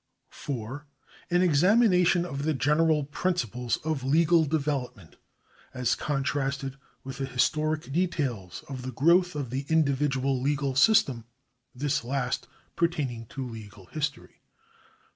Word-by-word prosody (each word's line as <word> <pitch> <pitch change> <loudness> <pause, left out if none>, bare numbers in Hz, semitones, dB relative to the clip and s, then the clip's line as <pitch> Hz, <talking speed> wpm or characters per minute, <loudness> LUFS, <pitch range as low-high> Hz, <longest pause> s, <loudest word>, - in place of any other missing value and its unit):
4. 135 +2 -6 0.4
An 175 +1 +3
examination 180 +1 +4
of 140 -5 -5
the 155 +1 0
general 150 +3 +2
principles 125 - -1
of 155 -4 -1
legal 160 +4 +4
development, 135 - -3 0.6
as 125 -2 +1
contrasted 135 -1 -2 0.3
with 135 0 -8
the 135 - -2
historic 150 +2 0
details 135 - -2
of 135 -3 -6
the 130 +1 -5
growth 170 +7 +3
of 140 -5 -4
the 135 +2 -3
individual 140 -4 +1
legal 140 0 0
system, 135 - +4 0.5
this 140 0 -1
last 125 0 -2 0.3
pertaining 140 -10 -1
to 130 +1 -6
legal 105 -4 -10
history. 155 0 -4
140 Hz, 120 wpm, -27 LUFS, 130-160 Hz, 0.6 s, examination